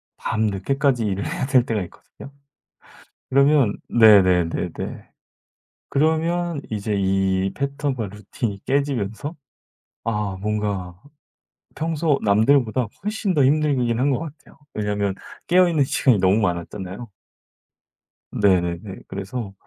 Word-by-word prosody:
밤늦게까지 115 +4 0
일을 100 -1 -2
해야 - - -2
될 130 -3 +4
때가 110 -5 -1
있거든요. 115 +9 -13 1.0
그러면 140 -4 +3
네네네네. 95 -7 +4 1.2
그러면 160 +2 0
이제 105 -1 -2
이 95 0 +1
패턴과 140 -5 -2
루틴이 105 +1 -5
깨지면서 140 - -1 0.7
아 105 -4 -2
뭔가 100 -4 -3 0.7
평소 160 -2 0
남들보다 115 +3 +3 0.2
훨씬 210 -2 -1
더 145 -5 +4
힘들긴 135 -5 +2
한 140 +2 +2
것 130 - 0
같아요. 155 -3 -10 0.2
왜냐면 105 -2 -1 0.3
깨어있는 175 -5 +4
시간이 130 -3 +2
너무 95 +2 +3
많았잖아요. 95 +3 -4 1.3
네네네. 90 0 0
그래서 100 +2 -6
110 Hz, 250 characters per minute, -22 LUFS, 100-140 Hz, 1.3 s, 될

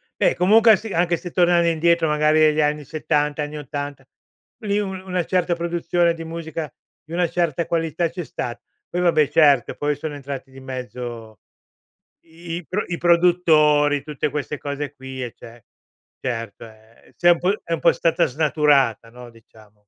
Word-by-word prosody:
beh, - - +2
comunque 220 +5 +5
a - - +7
se 215 0 -7
anche 175 0 +1
se 175 +1 -8
tornare 175 -1 +3
indietro 170 0 +2
magari 150 +1 +2
negli 155 0 +4
anni 150 0 0
'70, 150 0 -1
anni 150 +1 -6
'80, 145 -1 -6 0.6
lì 205 -1 0
u 205 - -2
una 185 -1 -3
certa 180 -1 0
produzione 170 0 0
di 165 - -7
musica 160 -1 -6 0.3
di 160 - -12
una 175 -1 +1
certa 170 -2 -1
qualità 165 0 -1
c'è 175 +1 -6
sta. 120 -5 -5 0.3
Poi 180 - -2
vabbè, 160 -5 +3
certo, 145 -5 +3
poi 145 0 -1
sono 145 +1 -6
entrati 135 -1 -7
di 135 - -13
mezzo 125 -4 -7 0.8
i 165 +1 -8
i 175 - -8
pro 195 +3 -2
i 175 - -3
produttori, 160 -4 +3
tutte 150 0 -3
queste 150 0 -4
cose 145 0 -5
qui, 130 -1 -7
eh, 120 - -5
ce 115 -1 -14 0.6
certo, 115 -3 -5
e 110 +1 -19
e - - -23
s'è 175 - +3
un 170 - +2
po' 185 +3 +1
è 170 - -10
un 165 - -1
po' 170 - +5
stata 165 -1 +1
snaturata, 140 -5 +1
no, 125 +1 -12
diciamo. 110 -2 -20
155 Hz, 180 wpm, -22 LUFS, 135-170 Hz, 0.8 s, a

